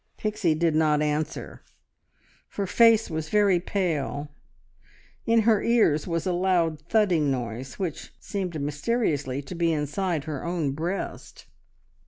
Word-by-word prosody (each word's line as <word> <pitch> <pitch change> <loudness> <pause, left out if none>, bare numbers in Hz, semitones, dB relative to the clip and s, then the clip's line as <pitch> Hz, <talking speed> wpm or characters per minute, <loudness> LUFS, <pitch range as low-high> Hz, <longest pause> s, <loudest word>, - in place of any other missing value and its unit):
Pixie 205 -7 0
did 165 0 +1
not 150 -1 +3
answer. 150 +1 -3 0.9
Her 200 - -2
face 225 +2 +5
was 160 -1 -4
very 200 -3 +3
pale; 155 -6 -2 1.0
in 230 0 +4
her 220 -1 +3
ears 215 -11 +2
was 165 -1 -2
a 185 - 0
loud 175 -4 +1
thudding 180 -10 +3
noise, 125 0 -4
which 180 -6 -4
seemed 185 -6 -4
mysteriously 145 - -1
to 140 - -8
be 170 -1 +1
inside 155 +2 -1
her 150 -3 -5
own 170 -5 -1
breast. 170 +7 -5
165 Hz, 130 wpm, -26 LUFS, 150-195 Hz, 1.0 s, face